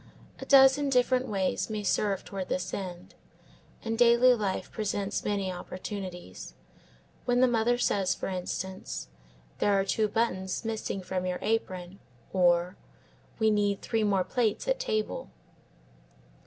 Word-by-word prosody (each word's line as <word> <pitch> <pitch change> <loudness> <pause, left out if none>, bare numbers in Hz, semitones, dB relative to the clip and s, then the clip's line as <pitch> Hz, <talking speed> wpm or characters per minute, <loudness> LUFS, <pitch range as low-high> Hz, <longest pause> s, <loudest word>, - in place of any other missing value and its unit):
A - - -7
dozen 275 +1 +6
different 255 0 +2
ways 190 -2 -1
may 215 -1 -3
serve 195 0 0
toward 195 -2 -5
this 180 0 -2
end, 180 -2 -6 0.7
and 225 0 -2
daily 240 +1 +6
life 205 -5 -2
presents 205 -1 -2
may 200 -2 -1
opportunities; 185 0 -7 0.7
when 245 0 +2
the 255 - +6
mother 240 0 +2
says, 195 -6 +1
for - - -5
instance, 185 - -5 0.5
"There 200 -1 +3
are 195 - +1
two 215 +2 +1
buttons 200 -2 -1
missing 220 -3 -3
from 185 0 -2
your 180 0 -1
apron," 190 -4 -2 0.3
or 175 0 +3 0.6
"We 220 -1 +3
need 205 -1 +1
three 225 -2 0
more 195 -3 +2
plates 225 - -1
at - - +1
table." 215 - -2
205 Hz, 135 wpm, -29 LUFS, 185-230 Hz, 0.7 s, dozen